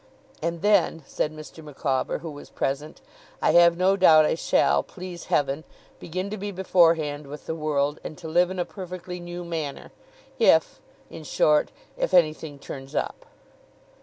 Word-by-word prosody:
'And 170 Hz, +1 st, -3 dB
then,' 200 Hz, -6 st, +3 dB
said 150 Hz, -, -2 dB
Mr. 155 Hz, +1 st, -11 dB
Micawber, 140 Hz, -2 st, -2 dB
who 165 Hz, -, -6 dB
was 145 Hz, 0 st, -11 dB
present, 145 Hz, +3 st, -3 dB, 0.4 s
'I -, -, +3 dB
have 170 Hz, 0 st, +6 dB
no 185 Hz, +2 st, +3 dB
doubt 160 Hz, -5 st, +6 dB
I -, -, +2 dB
shall, 70 Hz, -, +2 dB
please 180 Hz, -2 st, -9 dB
Heaven, 145 Hz, +1 st, 0 dB, 0.4 s
begin 185 Hz, +4 st, -4 dB
to 215 Hz, -, -4 dB
be 205 Hz, +1 st, -4 dB
beforehand 165 Hz, -6 st, +2 dB
with 150 Hz, +1 st, -9 dB
the -, -, -3 dB
world, 150 Hz, -2 st, -1 dB
and 155 Hz, -, -7 dB
to 170 Hz, -, -8 dB
live 175 Hz, +3 st, +3 dB
in 185 Hz, -, -5 dB
a 175 Hz, -, 0 dB
perfectly 180 Hz, -2 st, -7 dB
new 175 Hz, 0 st, -7 dB
manner, 160 Hz, -4 st, -5 dB, 0.5 s
if -, -, +4 dB, 0.3 s
in 160 Hz, -, -9 dB
short, 150 Hz, 0 st, +2 dB, 0.3 s
if 185 Hz, -, 0 dB
anything 155 Hz, -3 st, +2 dB
turns 135 Hz, +1 st, -9 dB
up. -, -, -3 dB
160 Hz, 165 wpm, -25 LUFS, 150-180 Hz, 0.5 s, have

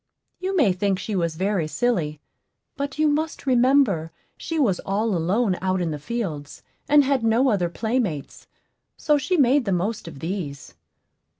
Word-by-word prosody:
You 380 Hz, +1 st, -2 dB
may 250 Hz, -, +4 dB
think 195 Hz, +1 st, 0 dB
she 205 Hz, +2 st, -4 dB
was 170 Hz, -3 st, -1 dB
very 190 Hz, -2 st, 0 dB
silly; 155 Hz, -4 st, -1 dB, 0.6 s
but 280 Hz, 0 st, -4 dB
you 310 Hz, 0 st, +3 dB
must 305 Hz, +1 st, -1 dB
remember 250 Hz, -, +3 dB, 0.2 s
she 330 Hz, -, -5 dB
was 220 Hz, -, +2 dB
all 205 Hz, +1 st, -1 dB
alone 185 Hz, +4 st, +1 dB
out 185 Hz, 0 st, 0 dB
in 170 Hz, -3 st, -1 dB
the 150 Hz, -, -4 dB
fields, 155 Hz, -6 st, -5 dB, 0.3 s
and 290 Hz, 0 st, +6 dB
had 270 Hz, -3 st, +1 dB
no 230 Hz, +4 st, +3 dB
other 185 Hz, -6 st, +1 dB
playmates; 220 Hz, -, -3 dB, 0.5 s
so 300 Hz, -2 st, +2 dB
she 320 Hz, +6 st, 0 dB
made 270 Hz, -1 st, +4 dB
the 200 Hz, -, -1 dB
most 190 Hz, +3 st, -2 dB
of 165 Hz, -, -9 dB
these. 160 Hz, -3 st, -5 dB
210 Hz, 165 wpm, -23 LUFS, 175-265 Hz, 0.6 s, and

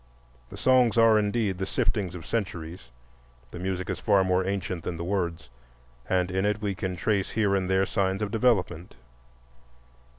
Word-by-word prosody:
The -, -, -10 dB
songs 125 Hz, -3 st, +3 dB
are 115 Hz, -1 st, +6 dB
indeed 105 Hz, -2 st, -1 dB
the 95 Hz, -, -1 dB
siftings 95 Hz, -5 st, -1 dB
of 85 Hz, -4 st, -8 dB
centuries; 85 Hz, -, -4 dB, 0.6 s
the 85 Hz, -, -8 dB
music 95 Hz, 0 st, -3 dB
is 95 Hz, -3 st, -3 dB
far 100 Hz, -1 st, +3 dB
more 95 Hz, 0 st, +1 dB
ancient 95 Hz, -3 st, -3 dB
than 85 Hz, -, -4 dB
the 85 Hz, -, -4 dB
words, 85 Hz, -3 st, -2 dB, 0.6 s
and 90 Hz, -1 st, +1 dB
in 95 Hz, +1 st, 0 dB
it 105 Hz, +1 st, 0 dB
we 105 Hz, -2 st, -2 dB
can 95 Hz, -1 st, -4 dB
trace 100 Hz, +2 st, 0 dB
here 105 Hz, -3 st, +1 dB
and 95 Hz, -1 st, -1 dB
there 95 Hz, 0 st, +3 dB
signs 95 Hz, +1 st, -1 dB
of 100 Hz, -, -3 dB
development. 100 Hz, -8 st, 0 dB
95 Hz, 170 wpm, -27 LUFS, 90-105 Hz, 0.6 s, are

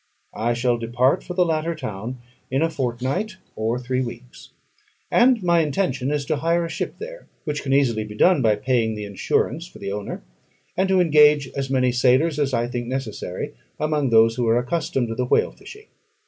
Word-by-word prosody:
I 120 Hz, +2 st, 0 dB
shall 120 Hz, 0 st, +1 dB
depart 120 Hz, +3 st, +1 dB
for 180 Hz, -, -7 dB
the 180 Hz, -1 st, +3 dB
latter 165 Hz, 0 st, -1 dB
town 110 Hz, +3 st, -5 dB, 0.3 s
in 135 Hz, +4 st, +1 dB
a 165 Hz, -, +1 dB
fortnight 135 Hz, -, -2 dB, 0.2 s
or 110 Hz, +2 st, -1 dB
three 125 Hz, +1 st, -2 dB
weeks; 120 Hz, 0 st, -8 dB, 0.6 s
and 240 Hz, -3 st, +4 dB
my 170 Hz, -1 st, +4 dB
intention 140 Hz, -4 st, 0 dB
is 145 Hz, -1 st, -1 dB
to 145 Hz, -, 0 dB
hire 170 Hz, +3 st, +1 dB
a -, -, -5 dB
ship -, -, -4 dB
there, -, -, -9 dB, 0.2 s
which 150 Hz, -2 st, -3 dB
can 135 Hz, -, -3 dB
easily 125 Hz, -6 st, +2 dB
be 105 Hz, 0 st, -9 dB
done 175 Hz, +6 st, +4 dB
by 110 Hz, -3 st, +3 dB
paying 115 Hz, 0 st, 0 dB
the 105 Hz, -1 st, -5 dB
insurance 125 Hz, -, -1 dB
for -, -, -14 dB
the 100 Hz, -, -5 dB
owner, 100 Hz, -8 st, -5 dB, 0.5 s
and 190 Hz, +1 st, +1 dB
to 190 Hz, -1 st, +4 dB
engage 150 Hz, -4 st, +5 dB
as 135 Hz, -1 st, -4 dB
many 130 Hz, -2 st, +2 dB
sailors 130 Hz, +6 st, +3 dB
as 140 Hz, -2 st, +1 dB
I 120 Hz, -2 st, +1 dB
think 120 Hz, 0 st, -4 dB
necessary 120 Hz, -8 st, -4 dB, 0.3 s
among 150 Hz, -3 st, 0 dB
those 115 Hz, 0 st, +5 dB
who 120 Hz, -2 st, 0 dB
are 115 Hz, +1 st, +4 dB
accustomed 125 Hz, -1 st, -1 dB
to -, -, -2 dB
the 125 Hz, +2 st, -1 dB
whale -, -, +2 dB
fishing. 425 Hz, +1 st, -13 dB
130 Hz, 195 wpm, -23 LUFS, 120-160 Hz, 0.6 s, engage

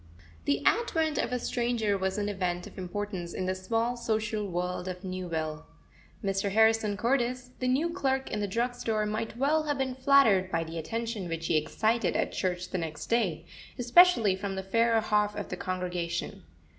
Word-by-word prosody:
The 140 Hz, 0 st, 0 dB
advent 325 Hz, -9 st, +2 dB
of -, -, -1 dB
a 250 Hz, -, +1 dB
stranger 235 Hz, -4 st, 0 dB
was 190 Hz, 0 st, -1 dB
an 205 Hz, 0 st, -1 dB
event 180 Hz, -3 st, -2 dB
of -, -, -12 dB
importance 185 Hz, -1 st, -4 dB
in 185 Hz, -, -2 dB
the 185 Hz, -, 0 dB
small 225 Hz, +6 st, -1 dB
social 215 Hz, -3 st, -1 dB
world 180 Hz, 0 st, -3 dB
of 180 Hz, +1 st, -5 dB
Newville. 165 Hz, -4 st, -4 dB, 0.6 s
Mr. 195 Hz, 0 st, 0 dB
Harrison 220 Hz, -1 st, +3 dB
Cordis, 250 Hz, +1 st, 0 dB
the 255 Hz, -, -1 dB
new 290 Hz, +7 st, +2 dB
clerk 270 Hz, -6 st, -1 dB
in -, -, -1 dB
the 205 Hz, -, -1 dB
drug 235 Hz, +5 st, 0 dB
store, 225 Hz, -3 st, -1 dB
might 215 Hz, +2 st, -3 dB
well 290 Hz, +5 st, +2 dB
have 290 Hz, -1 st, 0 dB
been 265 Hz, -1 st, -1 dB
flattered 255 Hz, -8 st, +4 dB
by 165 Hz, 0 st, +1 dB
the 165 Hz, 0 st, -6 dB
attention 225 Hz, +2 st, -3 dB
which 165 Hz, 0 st, -3 dB
he 165 Hz, -, +1 dB
excited 220 Hz, +9 st, +1 dB
at -, -, 0 dB
church 180 Hz, -1 st, -2 dB
the 185 Hz, -, -1 dB
next 160 Hz, +3 st, -5 dB
day, 180 Hz, -9 st, +1 dB, 0.3 s
especially 240 Hz, -, +5 dB
from 195 Hz, 0 st, -4 dB
the 190 Hz, -, -3 dB
fairer 230 Hz, +3 st, +3 dB
half 210 Hz, -1 st, +1 dB
of -, -, -5 dB
the -, -, -3 dB
congregation. 180 Hz, -2 st, -3 dB
210 Hz, 180 wpm, -29 LUFS, 185-240 Hz, 0.6 s, especially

